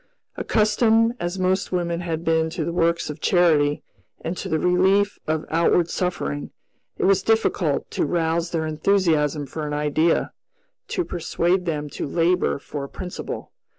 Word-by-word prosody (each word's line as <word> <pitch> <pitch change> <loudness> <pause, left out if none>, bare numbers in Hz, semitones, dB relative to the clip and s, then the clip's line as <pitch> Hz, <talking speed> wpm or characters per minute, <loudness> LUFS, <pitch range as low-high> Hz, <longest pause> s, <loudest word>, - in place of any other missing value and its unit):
Accustomed, 225 +1 +2
as 175 +2 -3
most 185 +1 0
women 170 -2 -1
had 165 -1 -4
been 160 0 +2
to 170 - -2
works 170 -2 +1
of 150 +1 -11
charity 155 -5 +3 0.4
and 165 - -3
to - - -5
the 160 - +1
relief 190 +4 +2
of 155 0 -1
outward 170 +1 +2
suffering, 75 - -2 0.5
it - - 0
was 195 0 +4
difficult 200 -9 +1
to - - 0
rouse 165 +1 0
their 160 -2 -1
enthusiasm 155 -3 +1
for 150 +3 -5
an 150 - -4
idea, 150 +3 +1 0.6
to 360 - -2
persuade 175 +2 0
them 150 -2 -2
to - - -4
labor 170 +4 +1
for 140 0 -6
a - - -11
principle. 180 -1 -6
170 Hz, 150 wpm, -23 LUFS, 155-185 Hz, 0.6 s, was